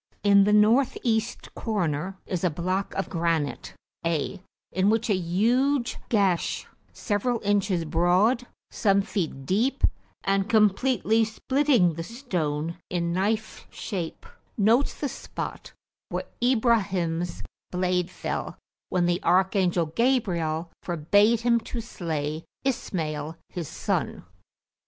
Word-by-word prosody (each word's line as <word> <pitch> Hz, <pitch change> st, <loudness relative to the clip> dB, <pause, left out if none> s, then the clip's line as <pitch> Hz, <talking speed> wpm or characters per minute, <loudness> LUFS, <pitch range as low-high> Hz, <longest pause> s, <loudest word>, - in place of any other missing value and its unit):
In 200 Hz, -1 st, +6 dB
the 210 Hz, -, +3 dB
north 220 Hz, +6 st, +4 dB
east 225 Hz, -1 st, -1 dB
corner 185 Hz, -4 st, -2 dB
is 180 Hz, -2 st, -3 dB
a 180 Hz, -, +4 dB
block 185 Hz, +5 st, -2 dB
of 195 Hz, -, -1 dB
granite 165 Hz, -4 st, -1 dB, 0.3 s
(A), 170 Hz, +3 st, -1 dB, 0.3 s
in 190 Hz, +2 st, +2 dB
which 225 Hz, 0 st, +1 dB
a -, -, +4 dB
huge 235 Hz, +9 st, +1 dB
gash, 195 Hz, -6 st, +1 dB, 0.3 s
several 230 Hz, +3 st, -1 dB
inches 200 Hz, -4 st, +1 dB
broad, 180 Hz, +10 st, +2 dB, 0.2 s
some 200 Hz, -2 st, +2 dB
feet 165 Hz, -10 st, -3 dB
deep, 235 Hz, -, +1 dB, 0.4 s
and 195 Hz, 0 st, +1 dB
completely 220 Hz, +1 st, +3 dB
splitting 245 Hz, -, +2 dB
the 165 Hz, +1 st, -5 dB
stone 170 Hz, -, -3 dB
in 170 Hz, -1 st, -1 dB
knife 215 Hz, +4 st, -1 dB
shape, 175 Hz, -5 st, -5 dB, 0.3 s
notes 230 Hz, +6 st, +3 dB
the 290 Hz, -, -2 dB
spot -, -, -6 dB, 0.4 s
where -, -, -3 dB, 0.2 s
Ibrahims 195 Hz, -9 st, +1 dB, 0.3 s
blade 180 Hz, 0 st, 0 dB
fell -, -, -4 dB, 0.3 s
when 180 Hz, -1 st, +1 dB
the 175 Hz, 0 st, +1 dB
archangel 180 Hz, -1 st, +2 dB
Gabriel 170 Hz, -6 st, 0 dB
forbade 205 Hz, +7 st, +3 dB
him 235 Hz, 0 st, +3 dB
to 235 Hz, +1 st, -6 dB
slay 160 Hz, -7 st, -3 dB, 0.2 s
Ismail 160 Hz, -, -2 dB
his 175 Hz, -5 st, -5 dB
son. -, -, -2 dB
195 Hz, 115 wpm, -26 LUFS, 170-225 Hz, 0.4 s, In